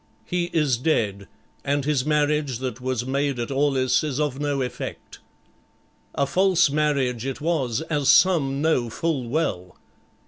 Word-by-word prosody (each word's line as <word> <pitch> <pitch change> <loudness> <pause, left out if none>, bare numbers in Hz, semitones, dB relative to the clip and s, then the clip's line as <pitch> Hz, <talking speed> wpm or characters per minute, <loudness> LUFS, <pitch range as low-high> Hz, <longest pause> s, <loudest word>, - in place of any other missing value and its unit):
"He 175 -1 -1
is 150 -7 +1
dead 105 -8 -1 0.4
and 140 0 0
his 145 -2 0
marriage 150 -3 +1
that 125 -1 -5
was 125 -2 -2
made 140 0 -1
at 120 +2 -4
Aulis 135 -1 +2
is 145 -2 -2
of 145 -3 -1
no 145 -2 -1
effect." 125 0 -7 1.0
"A 140 - +1
false 180 0 +3
marriage 140 -6 0
it 135 0 -4
was, 145 -7 -1
as 150 -4 -1
some 145 -7 +4
know 130 -7 +1
full 135 -1 -2
well." 105 - -2
140 Hz, 145 wpm, -24 LUFS, 125-150 Hz, 1.0 s, some